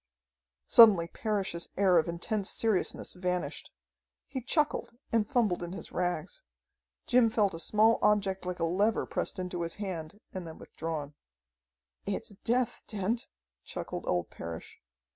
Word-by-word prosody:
Suddenly 200 -8 +8
Parrish's 195 -6 -2
air 185 -3 +5
of 160 - 0
intense 190 +4 -2
seriousness 220 -5 0
vanished. 180 -5 -3 0.6
He 265 -1 -5
chuckled 295 -2 0
and 220 -2 +2
fumbled 215 -9 +2
in 175 0 -5
his 195 - -7
rags. 180 - -2 0.6
Jim 245 -2 +5
felt 210 -4 +2
a 165 - -6
small 220 +5 +4
object 200 -2 +2
like 180 0 -3
a - - 0
lever 200 +7 +2
pressed - - -2
into 180 -1 -3
his 170 0 -2
hand 185 -2 -5
and 185 -3 -5
then 160 - -9
withdrawn. 155 -3 -5 0.9
"It's 200 - -2
death, 245 0 +1
Dent," 215 +3 -2 0.4
chuckled - - -6
old 90 -1 0
Parrish. 85 -1 -8
190 Hz, 140 wpm, -30 LUFS, 170-220 Hz, 0.9 s, Suddenly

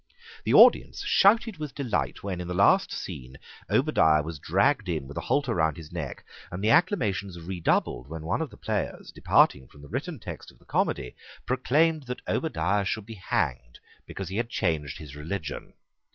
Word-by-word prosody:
The - - +1
audience - - +6
shouted 225 - +4
with 150 -3 -6
delight 125 -7 -2
when, 95 -3 -3
in 90 - -6
the 90 - -3
last 100 - +4
scene, 65 +1 -7 0.3
Obadiah 75 -1 +3
was 80 -1 -6
dragged 100 - +1
in 80 -6 -2
with 70 - -10
a - - -3
halter 140 -5 0
round 80 -5 +1
his 80 0 -10
neck; 85 -6 -6 0.3
and 90 +3 -5
the 110 - +3
acclamations 100 - +1
redoubled 80 -7 -1
when 80 0 -6
one 80 - -1
of - - -3
the - - -15
players, - - -3
departing 65 - +3
from 70 - -17
the - - -11
written 145 +7 -4
text 90 -8 -8
of - - -19
the - - -25
comedy, 60 - -1 0.3
proclaimed 145 +4 +1
that 125 - -6
Obadiah 100 - 0
should 110 +1 -2
be 115 - -8
hanged 65 - -2 0.3
because 95 - -6
he 95 - -4
had 115 0 -1
changed 80 - -1
his 75 -3 -10
religion. 75 0 -5
95 Hz, 180 wpm, -27 LUFS, 80-125 Hz, 0.3 s, audience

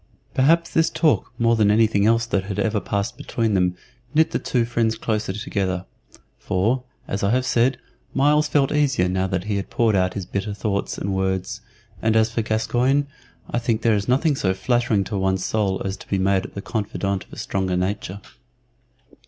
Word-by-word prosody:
Perhaps 165 +6 +3
this 165 0 +3
talk 155 -2 +1
more 115 0 +3
than 105 -2 +3
anything 105 -1 +3
else 115 +1 +3
that 100 -4 -1
had 100 -1 -5
ever 105 +1 +1
passed 100 +4 -3
between 115 -2 -1
them 90 -2 +2 0.4
knit 160 +1 +4
the - - 0
two 120 -2 0
friends 115 -1 0
the - - -14
closer 105 -3 -1
together, 95 -3 -2 0.5
for, 110 +8 0 0.3
as 100 - -3
I 100 - +2
have 125 +3 +1
said, 125 +1 +2 0.3
Myles 150 +2 +3
felt 140 -2 +2
easier 140 -10 +2
now 95 +1 0
that 95 -2 -2
he 105 0 -1
had 100 - -4
poured 115 -3 +2
out 90 -1 +1
his 100 -3 -4
bitter 100 +2 -3
thoughts 100 -2 -2
and 100 - -2
words; 95 +3 -2 0.4
and 110 0 +2
as 110 0 +3
for 115 - 0
Gascoyne, 120 +6 +1 0.4
I 120 - -1
think 115 -1 -1
that 115 - +4
there 110 - +4
is 100 -1 -2
nothing 140 +4 +2
so 95 -7 0
flattering 120 -1 +1
to 100 +1 -3
one's 95 -1 0
soul 100 -3 0
as 95 0 -3
to - - -13
be 100 - +1
made 95 0 +1
the 100 - -5
confidant 100 -3 -2
of - - -20
a - - -9
stronger 95 -2 -1
nature. 95 +1 -3
105 Hz, 200 wpm, -22 LUFS, 95-120 Hz, 0.5 s, knit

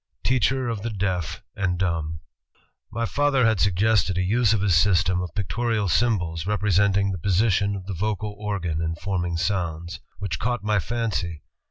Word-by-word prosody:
Teacher 130 +1 +1
of 115 -4 -3
the 115 - -3
Deaf 90 -6 -2
and 95 -3 0
Dumb 85 -3 -2 0.7
"My 115 +1 -1
father 140 0 +2
had 110 -3 +2
suggested 100 -1 +2
a 95 - +1
use 110 +3 +2
of 110 -3 +2
his 100 -3 +2
system 90 +1 +3
of 90 - -6
pic 100 -4 -2
torial 115 0 0
symbols 85 -5 +1
representing 100 -1 +2
the 90 - -4
position 100 +2 +2
of 95 -2 -7
the 100 - -4
vocal 105 +3 -2
organ 90 -6 -2
in 80 0 -1
forming 90 -2 -2
sounds... 85 -1 -2 0.2
which 100 -2 -3
caught 120 -2 -1
my 105 -1 +2
fancy. 100 -8 -2
100 Hz, 170 wpm, -24 LUFS, 90-110 Hz, 0.7 s, system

